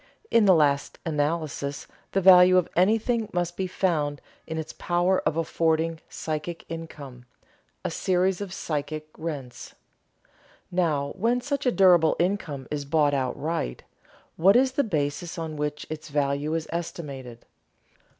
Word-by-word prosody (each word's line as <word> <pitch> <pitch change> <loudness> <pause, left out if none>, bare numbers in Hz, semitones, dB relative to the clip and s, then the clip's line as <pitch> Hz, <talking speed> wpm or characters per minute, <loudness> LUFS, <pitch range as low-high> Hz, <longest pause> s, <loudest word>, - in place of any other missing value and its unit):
In 230 -2 +5
the 190 -2 +7
last 145 -3 +2
analysis 150 -2 -2 0.3
the 195 - +2
value 185 0 +8
of 180 - +2
anything 220 +4 +2
must 175 -1 -1
be 190 - -2
found 155 -6 0 0.3
in 160 - -4
its 160 - -5
power 175 +2 +1
of 155 +1 0
affording 165 0 0
psychic 160 +2 -5
income, 145 -6 -8 0.6
a - - -1
series 185 +1 +1
of 200 -3 -5
psychic 155 -2 -4
rents. 145 -6 -7 1.0
Now 155 -6 0
when 230 +5 +1
such 280 +1 -2
a - - +4
durable 180 -6 +5
income 170 -8 -1
is 150 -1 -2
bought 145 0 +2
outright, 135 - -2 0.5
what 190 +5 +5
is 260 +1 +4
the 280 +2 +1
basis 165 - -2
on 160 -2 -4
which 150 0 -3
its 155 0 -7
value 145 +1 0
is 165 -1 -2
estimated? 140 -8 -6
165 Hz, 140 wpm, -26 LUFS, 145-185 Hz, 1.0 s, value